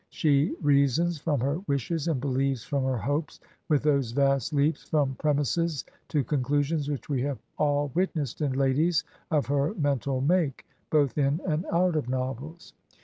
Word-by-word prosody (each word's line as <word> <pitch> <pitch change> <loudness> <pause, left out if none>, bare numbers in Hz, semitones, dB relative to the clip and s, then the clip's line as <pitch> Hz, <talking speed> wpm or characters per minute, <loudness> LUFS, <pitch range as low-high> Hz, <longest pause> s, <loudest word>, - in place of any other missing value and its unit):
She 150 0 +2
reasons 145 +4 +3
from 145 -4 0
her 140 +5 0
wishes 145 +4 -1
and 155 -6 +1
believes 135 -2 0
from 140 -2 -1
her 130 -1 0
hopes, 145 +6 -2 0.3
with 150 -3 +3
those 140 -6 +1
vast 135 0 +2
leaps 150 +2 +1
from 145 -4 +1
premises 150 +2 0 0.2
to 150 -3 0
conclusions 145 +3 0
which 145 -3 -4
we 135 -4 -1
have 140 -1 -2 0.2
all 145 -1 +1
witnessed 160 -7 -1
in 140 -3 0
ladies 140 +5 +2 0.3
of 150 -3 +1
her 145 +7 0
mental 140 - 0
make, 150 -1 +1 0.2
both 150 -1 +2
in 140 +2 +2
and 165 0 -1
out 175 0 +2
of 145 -5 -1
novels. 130 +6 -4
145 Hz, 160 wpm, -27 LUFS, 135-155 Hz, 0.3 s, reasons